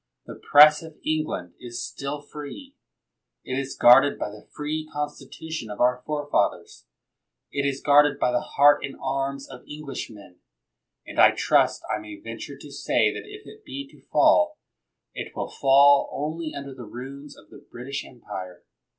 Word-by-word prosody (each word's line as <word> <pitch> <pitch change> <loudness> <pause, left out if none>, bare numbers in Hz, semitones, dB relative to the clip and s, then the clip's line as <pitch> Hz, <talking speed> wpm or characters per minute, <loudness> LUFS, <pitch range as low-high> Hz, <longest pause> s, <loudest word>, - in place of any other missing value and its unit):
The - - -8 0.2
Press 150 +1 +8
of 160 -2 -12
England 155 - -2
is 120 -1 -6
still 140 +1 -5
free. 150 - -9 0.7
It 130 +1 -3
is 135 0 -5
guarded 125 +4 +6
by 105 - -4
the 105 0 -14
free 155 +1 -4
Constitu 150 +1 -6
tion 120 -9 -4
of 105 - -7
our 125 0 +2
forefathers. 145 - -1 0.6
It 140 0 -1
is 140 -1 -3
guarded 145 0 +5
by 125 - +1
the 120 - +1
heart 145 +1 +4
and 135 - -5
arms 135 0 -3
of 130 -2 -11
Englishmen, 125 -11 -8 0.7
and - - -6
I - - +9
trust - - +2
I - - -4
may 105 -1 -9
venture 115 +5 -8
to 145 +1 -12
say 140 - +1
that - - -8
if 420 +1 -11
it 435 0 -14
be 280 -6 -7
to - - -19
fall, 305 0 +4 0.6
it - - -7
will - - -4
fall 140 +1 +5
only 155 +2 -4
under 140 -1 -7
the 125 -2 -10
ruins 140 +5 -9
of - - -19
the - - -12
British 130 +3 -5
Empire. 95 -7 -9
140 Hz, 165 wpm, -25 LUFS, 125-150 Hz, 0.7 s, I